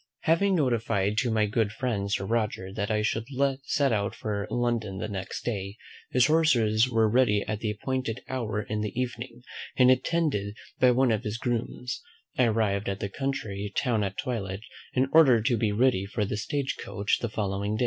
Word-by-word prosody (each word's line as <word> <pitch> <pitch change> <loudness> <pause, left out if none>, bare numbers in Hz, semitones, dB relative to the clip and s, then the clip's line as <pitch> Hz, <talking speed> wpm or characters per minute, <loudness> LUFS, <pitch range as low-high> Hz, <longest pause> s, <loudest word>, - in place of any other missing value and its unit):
Having 185 +4 +3
notified 115 - +1
to 125 - 0
my 110 -1 +2
good 105 0 0
friend 110 -4 -2
Sir 95 - 0
Roger 105 -4 -1
that 105 -1 -2
I 105 -1 +1
should 115 +1 -1 0.4
set 140 -2 +2
out 100 -2 -1
for 100 -2 -3
London 115 -5 -1
the 95 - -3
next 95 -2 -5
day, 100 -3 -3 0.3
his 125 -1 +4
horses 125 -8 +3
were 115 -2 +3
ready 105 -3 +3
at 105 -1 -2
the 110 - -2
appointed 120 +2 -3
hour 110 -5 -2
in 105 0 -3
the 105 +3 -3
evening; 120 -1 -4 0.3
and 125 0 +7
attended 130 - 0 0.2
by 125 - +6
one 125 0 +3
of 110 - +1
his 105 +1 -3
grooms, 120 +1 -3 0.3
I 125 - +4
arrived 105 -3 +1
at 100 0 -3
the 100 - -3
country 105 -6 -3
town 115 -5 +1
at 100 0 -3
twilight, 100 -6 -3 0.3
in 130 +1 +2
order 140 -8 +7
to 120 +1 +2
be 110 -1 +1
ready 105 -3 +2
for 105 +1 -1
the 105 - -3
stage 135 +6 -2
coach 100 +1 -1
the 120 - -2
day 110 - -13
following. 100 +1 -1
110 Hz, 190 wpm, -27 LUFS, 105-125 Hz, 0.4 s, and